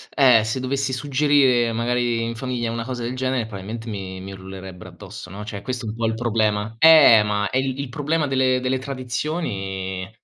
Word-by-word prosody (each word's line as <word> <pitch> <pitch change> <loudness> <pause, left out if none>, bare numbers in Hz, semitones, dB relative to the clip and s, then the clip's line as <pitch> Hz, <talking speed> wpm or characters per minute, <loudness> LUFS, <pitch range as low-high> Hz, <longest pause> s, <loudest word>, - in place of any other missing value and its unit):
eh, 125 -6 +6
se 110 +4 -2
dovessi 135 +1 -2
suggerire 135 -3 +2
magari 120 0 0
in 115 - -3
famiglia 120 -1 -3
una 115 0 -3
cosa 125 -1 -5
del 120 +2 -3
genere, 130 -2 -1
probabilmente 110 +2 -7
mi 95 -3 -6
mi 95 +1 -8
urlerebbero 95 -1 -10
addosso, 95 - -11
no, 100 +3 -8
cioè 100 -1 -6
questo 125 -2 -4
è - - -3
un 110 - -6
po' 115 0 -2
il 110 - -1
problema 110 -2 0
Eh, 155 -8 +8
ma 105 0 -1
è 130 - 0
il 130 0 -1
il 140 -2 -4
problema 150 +4 -1
delle 130 -2 +2
delle 130 +1 0
tradizioni, 115 - -4
120 Hz, 195 wpm, -22 LUFS, 105-130 Hz, -, Eh